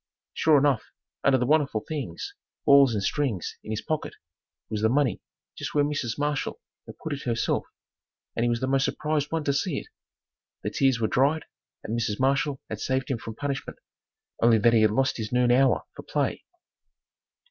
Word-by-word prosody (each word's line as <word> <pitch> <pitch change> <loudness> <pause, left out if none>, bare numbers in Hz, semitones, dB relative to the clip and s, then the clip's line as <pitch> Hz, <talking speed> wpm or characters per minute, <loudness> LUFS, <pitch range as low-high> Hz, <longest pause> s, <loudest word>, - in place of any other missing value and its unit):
Sure 155 -2 +4
enough, 140 -4 +2 0.4
under 135 -1 +5
the 125 - 0
wonderful 145 -6 +2
things, 135 - -5 0.3
balls 140 -4 +6
and 100 - -1
strings 120 - -1
in - - -10
his 110 -1 -3
pocket, 155 -2 -3 0.5
was 105 -1 -3
the 110 - +3
money 130 -4 +1 0.3
just - - -6
where 145 - +4
Mrs. 145 -6 -2
Marshall 145 -1 -1 0.3
had - - -10
put 160 - -4
it 140 - -5
herself 120 -1 -1 0.7
and 115 - 0
he 120 - +2
was 120 0 0
the - - +1
most 135 0 +2
surprised 150 -1 -1
one 165 -1 -1
to 140 - +1
see 145 +1 -1
it. - - -6 0.7
The - - -2
tears 135 -3 +2
were 110 - +1
dried 145 +7 +2 0.4
and 110 - -3
Mrs. 110 -3 -1
Marshall 140 +1 +1
had - - -5
saved 130 0 -1
him 120 - -1
from 110 0 -7
punishment 140 +1 -4 0.6
only 115 -1 +6
that 115 +2 +4
he 115 - +5
had 110 - +5
lost 135 +6 +1
his 110 -2 -4
noon 125 0 +3
hour 130 +2 +4
for - - -8
play. - - -2
135 Hz, 190 wpm, -26 LUFS, 115-145 Hz, 0.7 s, balls